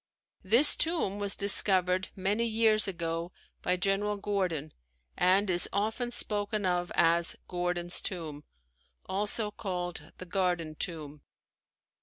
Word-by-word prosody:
This 235 +10 +5
tomb 320 - +1
was 200 -1 +5
discovered 190 -2 +3
many 205 +5 -1
years 220 -1 +3
ago 170 -1 -4 0.3
by 180 - 0
General 200 +2 -1
Gordon 185 -7 -3 0.4
and 195 +3 +2
is 175 -1 +3
often 220 +4 -2
spoken 210 -3 -3
of 175 -1 -1
as 170 0 +3
Gordon's 175 -1 0
Tomb, 155 -6 -6 0.6
also 210 +2 -1
called 180 -4 -6
the 185 - -9
Garden 175 -4 -2
Tomb. 150 -3 -5
185 Hz, 115 wpm, -29 LUFS, 175-205 Hz, 0.6 s, This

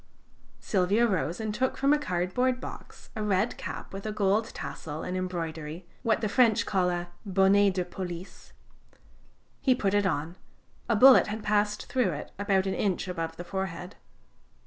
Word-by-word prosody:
Silvio 200 +3 +2
rose 185 -4 -1
and 215 -1 -2
took 255 +4 -1
from 275 +2 +3
a 295 - +2
cardboard 250 +3 0
box - - -10
a 215 - -3
red 210 +1 +1
cap - - -7
with 195 0 -6
a 215 - -3
gold 210 +1 +2
tassel 160 -8 -6
and 180 - -3
embroidery 165 -2 -4 0.2
(what 225 -2 +1
the 215 - +1
French 225 0 +3
call 185 -3 +1
a 175 0 -3
bonnet 195 0 +4
de 180 -1 0
police); 180 0 -8 1.1
he 260 -2 +3
put 200 -5 0
it 205 -1 +3
on 160 0 -2 0.5
a 230 - +3
bullet 260 +4 +8
had 210 +1 -4
passed 210 0 +1
through 250 -6 +1
it 145 - -7
about 195 -2 +2
an 190 - -1
inch 195 -2 -1
above 165 -2 -4
the 175 - -5
forehead. 190 -1 -5
195 Hz, 170 wpm, -28 LUFS, 180-215 Hz, 1.1 s, bullet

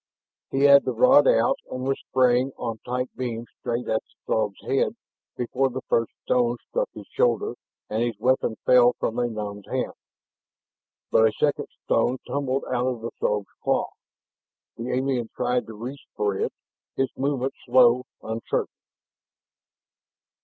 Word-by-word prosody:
He 135 - -1
had 140 0 +8
the 130 - -1
rod 265 - +6
out - - +3
and 130 - -4
was 135 +1 0
spraying 130 +1 +2
on 115 -2 -4
tight 125 +2 -3
beam 120 -2 -4
straight 120 +1 -3
at 110 - +1
the - - -33
Throg's 105 -3 0
head 135 - +1 0.4
before 130 +2 0
the 130 +1 -6
first 115 -1 +2
stone 120 -1 +2
struck - - -1
his - - -9
shoulder 435 -3 +1 0.3
and 110 +1 -1
his 120 -1 -1
weapon 130 -3 +2
fell 125 -1 +6
from 115 - -2
a 120 - +2
numbed 105 -3 -6
hand. - - -2 1.2
But 110 - +6
a - - +1
second - - 0 0.2
stone 125 - +2
tumbled 135 -1 -1
out 125 0 0
of 125 -3 -2
the 115 - -4
Throg's 105 -1 -1
claw. - - +1 0.8
The 115 +2 -5
alien 125 -2 0
tried 125 0 0
to 110 - -8
reach 125 +6 -7
for 105 -2 0
it, - - -1 0.4
his 135 -1 0
movements 135 -1 -1
slow, 125 0 +5 0.2
uncertain. 110 +1 -2
125 Hz, 155 wpm, -25 LUFS, 115-135 Hz, 1.2 s, had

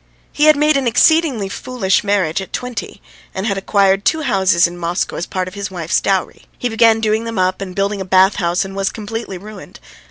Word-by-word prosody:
He 295 - +1
had 305 0 +7
made 300 0 +3
an 270 -3 -1
exceedingly 270 -3 +3
foolish 200 -2 -1
marriage 195 -4 0
at 190 - -9
twenty, 245 -5 -6 0.3
and 190 - -3
had 200 -3 0
acquired 195 0 +2
two 315 +6 +1
houses 190 -8 +3
in 175 0 -3
Moscow 175 +1 -2
as 175 - -4
part 185 -1 -3
of 185 - -8
his 200 0 -5
wife's 170 -3 -1
dowry. 195 -1 -2
He 245 - -2
began 225 0 +3
doing 220 +1 0
them 230 -2 -5
up 185 +1 0
and 185 -2 -6
building 200 0 -1
a - - -1
bath 190 +1 +3
house, 175 0 0
and 195 0 -9
was 195 -1 0
completely 220 -2 -6
ruined. 210 +3 -12
200 Hz, 215 wpm, -17 LUFS, 185-225 Hz, 0.3 s, had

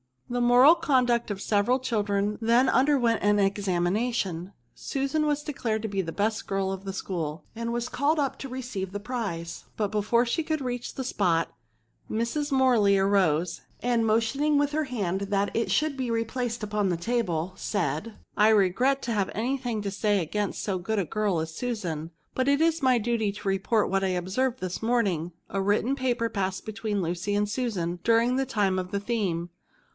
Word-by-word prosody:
The 245 0 0
moral 245 +5 +7
conduct 245 -7 +2
of 205 - -2
the 195 - -7
several 210 +4 +2
children 210 -4 -1
then 235 +3 +4
underwent 260 -4 +3
an 205 0 +3
examination; 195 -1 0 0.2
Susan 275 +3 -1
was 295 0 0
declared 240 -8 -2
to 220 - -2
be 195 -1 0
the 165 -3 -5
best 215 +2 -1
girl 195 -1 -1
of 195 0 -6
the 195 - -4
school, 165 -5 -4
and 230 +1 -3
was 240 +1 -2
called 285 +5 +1
up 280 -3 -1
to 270 - -6
receive 240 -7 -5
the 205 - -3
prize; 195 -8 -4
but 210 -2 -1
before 215 +3 +2
she 240 +8 0
could 310 -1 -2
reach 245 -2 -4
the 265 - -3
spot, 175 -9 0 0.6
Mrs. 235 +7 -1
Morley 245 -7 +4
arose, 185 -4 +2 0.2
and 240 -2 +2
motioning 250 +7 +2
with 290 0 +2
her 310 +1 0
hand 200 -8 -2
that 200 0 0
it 230 - 0
should 305 -2 +1
be 255 -2 -2
replaced 230 0 -2
upon 210 -2 0
the 175 - 0
table, 180 -4 -1
said, 200 +1 -2
" - - -39
I 210 +1 +6
regret 220 +7 +3
to 235 - -2
have 205 -4 0
any 250 +6 0
thing 240 -5 -3
to 200 - -2
say 205 0 +1
against 205 +5 -2
so 190 -3 -1
good 220 +5 -2
a 195 - +1
girl 205 -3 0
as 160 0 -5
Susan; 175 -8 -3 0.2
but 260 0 0
it 280 +2 +3
is 325 0 +2
my 260 -2 +4
duty 225 -2 0
to 200 - -8
report 195 +3 +1
what 195 0 +1
I - - +2
observed 230 +9 -1
this 185 -1 -4
morning: 200 -8 0 0.2
a 195 - -1
written 210 +7 +1
paper 245 -3 0
passed 190 -2 -2
between 215 -2 -2
Lucy 175 +4 -2
and 205 0 +1
Susan 205 -7 -2
during 230 +2 +3
the 270 - +1
time 200 -6 +1
of 185 - -3
writing - - -20
the 200 - -16
theme. 185 -8 -1
215 Hz, 195 wpm, -27 LUFS, 195-245 Hz, 0.6 s, moral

